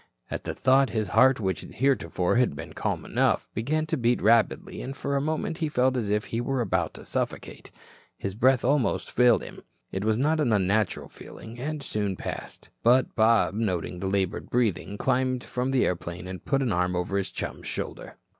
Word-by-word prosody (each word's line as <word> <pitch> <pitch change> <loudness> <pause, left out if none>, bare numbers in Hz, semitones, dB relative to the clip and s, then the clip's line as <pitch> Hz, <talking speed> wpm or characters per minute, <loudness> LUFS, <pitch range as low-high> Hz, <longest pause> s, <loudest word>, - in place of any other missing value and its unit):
At - - -4
the - - -3
thought, 135 +1 +4
his 110 -2 -2
heart 130 +4 +5
which 95 -4 -1
heretofore 110 -7 0
had 125 - +2
been 70 - -8
calm - - -2
enough, - - +1
began 155 +8 0
to 155 0 -1
beat 120 -1 +2
rapidly 115 +2 +2
and 135 +2 -6
for 140 - -2
a 140 - +1
moment 155 +2 -2
he 160 -3 0
felt 130 -2 +2
as 115 -5 -1
if 105 +1 +1
he 115 - -2
were 135 +1 -1
about 95 -8 0
to - - -10
suffocate. - - -4 0.5
His 100 - -4
breath 130 +4 +3
almost 140 -1 +1
failed 125 -2 +4
him. - - -10 0.3
It 95 - -3
was 110 0 +2
a - - -1
not 155 +3 +2
unnatural 105 -5 +1
feeling, 115 +2 -11
and 150 +2 -4
soon 105 -6 -1
passed, - - -7
but 125 +2 +4
Bob 110 -3 +3
noting 90 -5 -2
the 95 - -2
labored 95 -2 -1
breathing 105 -4 0
climbed 130 0 0
from 125 +1 -2
the 135 -1 +3
airplane 90 0 -3
and 95 -2 -7
put 135 -1 +1
an 125 - 0
arm 90 +1 +1
over 90 +3 -1
his 95 - -3
chum's - - -5
shoulder. - - -5
115 Hz, 195 wpm, -26 LUFS, 100-130 Hz, 0.5 s, heart